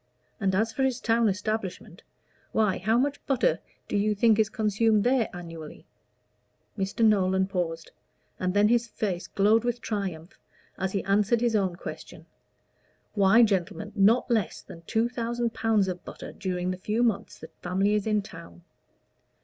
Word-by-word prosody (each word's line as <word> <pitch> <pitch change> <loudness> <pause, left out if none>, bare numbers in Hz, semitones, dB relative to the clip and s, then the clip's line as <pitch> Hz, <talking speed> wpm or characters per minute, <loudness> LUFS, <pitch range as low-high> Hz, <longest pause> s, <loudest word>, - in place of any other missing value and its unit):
And 190 -1 +1
as 220 +3 +1
for 270 - -3
his 260 -2 +1
town 230 -1 +2
establishment 205 -1 -4 0.5
why, 215 -4 +2
how 220 +5 +2
much 285 +3 -1
butter 270 - +2 0.3
do - - -3
you 210 +1 +1
think 220 +1 +4
is 220 -1 +3
consumed 215 0 +2
there 245 -1 +2
annually?" 165 -3 -9 0.9
Mr. 195 +3 0
Nolan 190 -3 +3
paused, 175 -4 -3 0.5
and 185 +1 -1
then 205 +1 +5
his 235 +1 +2
face 195 -5 -3
glowed 215 +3 +3
with 240 0 -1
triumph 190 -7 -5 0.4
as 190 0 -3
he 195 - -1
answered 205 +4 +2
his 235 -2 +1
own 190 -4 +1
question. - - -9 0.9
"Why, 205 +3 +5
gentlemen, 205 0 -1
not 225 +5 +3
less 220 -5 0
than 165 - -12
two 225 +1 +1
thousand 235 -1 -2
pounds 220 -3 +1
of 180 -2 -4
butter - - -9
during 180 -2 -3
the 185 - -4
few 215 +5 -1
months 225 -2 -1
the - - -11
family 190 +3 +1
is 210 0 0
in 210 -2 +1
town! 170 -2 -12
210 Hz, 160 wpm, -27 LUFS, 190-225 Hz, 0.9 s, then